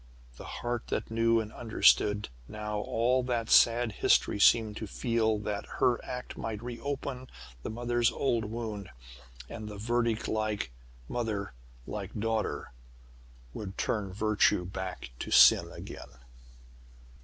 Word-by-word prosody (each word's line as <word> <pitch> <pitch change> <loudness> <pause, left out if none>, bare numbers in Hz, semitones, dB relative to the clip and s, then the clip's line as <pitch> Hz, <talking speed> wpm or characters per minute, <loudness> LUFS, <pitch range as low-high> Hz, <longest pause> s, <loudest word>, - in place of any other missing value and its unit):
The - - -9 0.2
heart 120 -1 -2
that - - -3
knew 115 0 +3
and 110 -1 -5
understood 105 - +3 0.2
now 105 0 -4
all 120 +5 +1
that 120 -2 -2
sad 115 0 +5
history 105 - +2
seemed 110 +1 +5
to 110 - -5
feel 110 -1 0
that 105 -1 -4
her 120 -1 +2
act 125 0 -6
might 110 0 -5
re 120 -1 -6
open 135 -2 -4 0.3
the - - -5
mother's 120 +1 +1
old 115 -5 0
wound; 105 -3 -5 0.6
that 110 - -7
the 105 -1 -7
verdict 115 +1 0
'like 105 - -1 0.4
mother, 105 - -3 0.3
like 100 -2 -6
daughter' 110 0 -2 0.8
would 100 -2 -7
turn 100 -3 -1
virtue 105 -3 +2
back 90 -8 -6
to - - -5
sin - - +7
again. - - -9
110 Hz, 130 wpm, -30 LUFS, 105-120 Hz, 0.8 s, sin